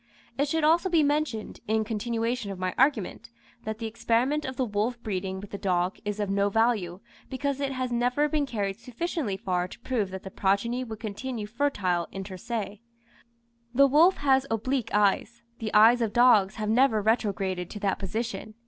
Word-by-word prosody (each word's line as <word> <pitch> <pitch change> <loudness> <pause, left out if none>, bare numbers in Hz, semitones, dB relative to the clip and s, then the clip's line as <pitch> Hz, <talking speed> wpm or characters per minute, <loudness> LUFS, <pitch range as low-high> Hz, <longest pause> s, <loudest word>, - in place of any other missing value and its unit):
It 285 +2 0
should 320 +2 0
also 335 +5 +4
be 330 -3 +4
mentioned, 290 -7 -1
in 220 +1 +1
continuation 230 +1 -2
of 195 - -5
my 185 0 -2
argument, 255 -9 +1 0.4
that 220 0 -3
the 225 - -5
experiment 235 +6 0
of 260 - -4
the 260 - +1
wolf 220 +3 -1
breeding 190 -3 -3
with 200 +1 -10
the 200 - -5
dog 180 -1 0
is 210 -1 -3
of 205 - 0
no 200 +1 +1
value, 205 -5 +1 0.3
because 280 +1 -2
it 275 -1 -1
has 255 -1 -3
never 245 +5 +1
been 295 -1 0
carried 200 -5 -2
sufficiently 250 - -3
far 180 -3 -1
to - - -12
prove 230 -6 -1
that 190 0 -7
the 190 - -8
progeny 230 +6 0
would 220 -3 -7
continue 225 +1 -5
fertile 205 -8 -1
inter 195 0 -6
se. 210 +1 -5 0.9
The 275 +2 +7
wolf 315 +7 +5
has 270 -1 +2
oblique 230 +2 -1
eyes 210 +3 +1 0.2
the 220 -1 -3
eyes 225 +3 +6
of 220 -3 0
dogs 220 -5 +5
have 215 -1 -3
never 235 -2 +4
retrograded 195 -5 0
to 210 - -7
that 195 -2 0
position. 220 +2 -4
225 Hz, 185 wpm, -27 LUFS, 200-255 Hz, 0.9 s, The